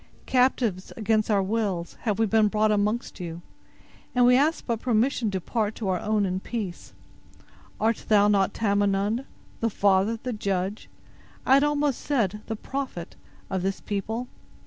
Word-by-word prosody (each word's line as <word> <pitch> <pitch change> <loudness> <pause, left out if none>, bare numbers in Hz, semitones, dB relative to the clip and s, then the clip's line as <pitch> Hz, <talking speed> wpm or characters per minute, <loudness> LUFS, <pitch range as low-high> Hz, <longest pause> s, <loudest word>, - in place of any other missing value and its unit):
"Captives 250 -7 +1
against 215 0 +1
our 200 -2 +3
wills, 195 -4 -2
have 210 -3 +1
we 225 - +3
been 220 0 +3
brought 215 +1 +2
amongst 210 +3 -1
you; 170 -1 -6 0.7
and 245 0 +5
we 250 0 +6
ask 300 +5 +2
but 230 -3 -1
permission 240 0 +1
to 195 - -2
depart 215 +3 -2
to 215 - -4
our 180 -1 +1
own 210 -1 +1
in 185 0 -1
peace. 200 -4 -6 0.9
Art 225 +1 0
thou 205 -1 +5
not 200 -1 +3
Tamenund—the 205 +3 -1
father, 200 +2 +2
the 250 - -2
judge, 195 -1 -2 0.6
I 260 - +5
had 275 +1 +6
almost 295 -2 +1
said, 210 -8 0
the 225 - -2
prophet—of 210 -6 -6
this 195 +1 -2
people?" 220 +4 -3
215 Hz, 150 wpm, -26 LUFS, 195-235 Hz, 0.9 s, we